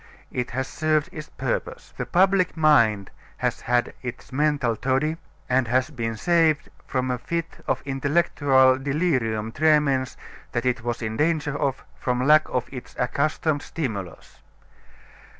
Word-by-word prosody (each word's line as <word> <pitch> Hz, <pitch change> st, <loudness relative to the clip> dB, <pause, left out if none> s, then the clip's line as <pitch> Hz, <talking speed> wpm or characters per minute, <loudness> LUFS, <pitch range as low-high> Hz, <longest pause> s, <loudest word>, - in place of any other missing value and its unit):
It 125 Hz, -1 st, -2 dB
has 130 Hz, +2 st, -3 dB
served 155 Hz, +1 st, 0 dB
its 155 Hz, -5 st, -8 dB
purpose. -, -, -4 dB
The -, -, -4 dB
public 185 Hz, -1 st, +3 dB
mind 115 Hz, -11 st, +4 dB, 0.3 s
has -, -, -1 dB
had 120 Hz, 0 st, 0 dB
its 125 Hz, 0 st, -8 dB
mental 145 Hz, -4 st, +1 dB
toddy 135 Hz, +7 st, 0 dB, 0.3 s
and 130 Hz, -1 st, +2 dB
has 130 Hz, +5 st, +1 dB
been 115 Hz, -4 st, -3 dB
saved 160 Hz, +3 st, +2 dB, 0.2 s
from 130 Hz, -1 st, -1 dB
a 125 Hz, -, -2 dB
fit 165 Hz, +5 st, -4 dB
of -, -, -1 dB
intellectual 135 Hz, -2 st, +3 dB
delirium 130 Hz, -7 st, 0 dB
tremens 145 Hz, -3 st, +2 dB, 0.4 s
that 120 Hz, +1 st, -1 dB
it 125 Hz, 0 st, +1 dB
was 120 Hz, 0 st, -3 dB
in 110 Hz, 0 st, -3 dB
danger 150 Hz, -2 st, +1 dB
of 135 Hz, -2 st, -2 dB
from 125 Hz, 0 st, 0 dB
lack 155 Hz, +1 st, +5 dB
of 125 Hz, -1 st, -1 dB
its 125 Hz, -, -9 dB
accustomed 145 Hz, +4 st, 0 dB
stimulus. 105 Hz, -, -6 dB
135 Hz, 140 wpm, -24 LUFS, 125-155 Hz, 0.4 s, lack